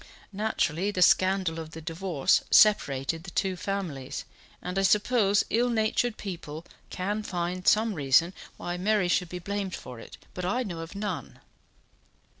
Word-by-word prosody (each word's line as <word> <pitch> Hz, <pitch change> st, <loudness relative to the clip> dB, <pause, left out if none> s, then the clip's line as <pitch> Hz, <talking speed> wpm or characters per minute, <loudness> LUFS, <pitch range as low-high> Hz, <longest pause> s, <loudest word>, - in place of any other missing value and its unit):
Naturally, 195 Hz, -3 st, 0 dB
the 185 Hz, -3 st, +2 dB
scandal 185 Hz, -2 st, +3 dB
of 160 Hz, 0 st, -8 dB
the 160 Hz, -, -7 dB
divorce 165 Hz, -2 st, +1 dB
separated 165 Hz, -7 st, +4 dB
the 190 Hz, -, -8 dB
two 190 Hz, +1 st, -1 dB
families; 175 Hz, -7 st, -4 dB, 0.3 s
and 180 Hz, +2 st, -3 dB
I -, -, +2 dB
suppose 205 Hz, 0 st, +3 dB
ill 240 Hz, +2 st, +2 dB
natured 225 Hz, 0 st, 0 dB
people 170 Hz, -4 st, -7 dB, 0.2 s
can 205 Hz, +4 st, -2 dB
find 180 Hz, -2 st, -3 dB
some 220 Hz, +1 st, +4 dB
reason 155 Hz, +3 st, +3 dB, 0.2 s
why 175 Hz, 0 st, -4 dB
Mary 200 Hz, 0 st, +1 dB
should 175 Hz, 0 st, +1 dB
be 180 Hz, -, -5 dB
blamed 195 Hz, +1 st, -3 dB
for 125 Hz, -2 st, -9 dB
it, -, -, -12 dB, 0.2 s
but 180 Hz, -, -5 dB
I 240 Hz, +8 st, 0 dB
know 175 Hz, -7 st, -6 dB
of 165 Hz, +3 st, -8 dB
none." 200 Hz, -3 st, -5 dB
185 Hz, 155 wpm, -27 LUFS, 165-205 Hz, 0.3 s, separated